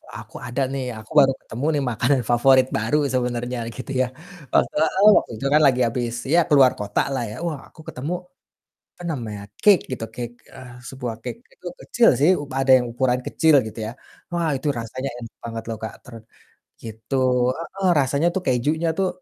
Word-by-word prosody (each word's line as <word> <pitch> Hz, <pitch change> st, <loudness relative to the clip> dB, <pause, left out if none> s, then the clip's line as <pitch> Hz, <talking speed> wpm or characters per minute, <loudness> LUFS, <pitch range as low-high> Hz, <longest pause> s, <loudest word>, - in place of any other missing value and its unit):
aku -, -, -11 dB
ada 120 Hz, +3 st, -2 dB
nih 135 Hz, -1 st, -2 dB, 0.2 s
aku 110 Hz, -, -15 dB
baru 135 Hz, -1 st, +5 dB
ketemu 125 Hz, +6 st, -6 dB
nih 145 Hz, -, 0 dB
makanan 125 Hz, +4 st, +1 dB
favorit 130 Hz, +2 st, +5 dB
baru 115 Hz, +7 st, +1 dB, 0.2 s
sebenarnya 125 Hz, -1 st, -1 dB, 0.2 s
gitu 130 Hz, -, -7 dB
ya 130 Hz, -, +1 dB, 0.4 s
wak -, -, +5 dB
heeh, 160 Hz, +6 st, +2 dB
waktu -, -, -1 dB
itu 135 Hz, -, -6 dB
kan 150 Hz, -, +5 dB
lagi 130 Hz, -1 st, +2 dB
habis 120 Hz, 0 st, -2 dB, 0.2 s
ya 170 Hz, -, +6 dB
keluar 135 Hz, -4 st, +6 dB
kota 105 Hz, 0 st, 0 dB
lah 130 Hz, -3 st, -1 dB
ya, 105 Hz, -, -7 dB
wah 155 Hz, -5 st, -3 dB
aku 160 Hz, -, -16 dB
ketemu, 145 Hz, +7 st, -4 dB, 0.8 s
apa -, -, -13 dB
namanya, 110 Hz, -7 st, -5 dB, 0.2 s
cake 205 Hz, -4 st, +6 dB
gitu, 115 Hz, -, -3 dB
cake, 120 Hz, -1 st, -5 dB, 0.2 s
eee, 125 Hz, -1 st, -11 dB, 0.2 s
sebuah 125 Hz, -3 st, -5 dB
cake, -, -, -6 dB
itu -, -, -16 dB, 0.2 s
kecil 240 Hz, -, +3 dB
sih, 150 Hz, +5 st, +5 dB
u -, -, -5 dB, 0.2 s
ada 135 Hz, -, +1 dB
yang 125 Hz, -, -3 dB
ukuran 125 Hz, 0 st, +1 dB
kecil 160 Hz, -1 st, +3 dB
gitu 110 Hz, -, -9 dB
ya, -, -, -4 dB, 0.4 s
wah 170 Hz, -1 st, 0 dB
itu 150 Hz, -, -3 dB
rasanya 130 Hz, +4 st, -4 dB
enak 115 Hz, -2 st, -10 dB
banget 115 Hz, -1 st, -5 dB
loh 115 Hz, -, -3 dB
Kak, 110 Hz, -, -5 dB
ter 125 Hz, -3 st, -12 dB, 0.7 s
gitu, 110 Hz, +4 st, -6 dB, 0.4 s
heeh, 190 Hz, +3 st, -3 dB
rasanya 140 Hz, +4 st, +1 dB
tuh 190 Hz, -, 0 dB
kejunya 150 Hz, +7 st, +1 dB
tuh, 195 Hz, -, +2 dB
130 Hz, 185 wpm, -22 LUFS, 120-150 Hz, 0.8 s, ya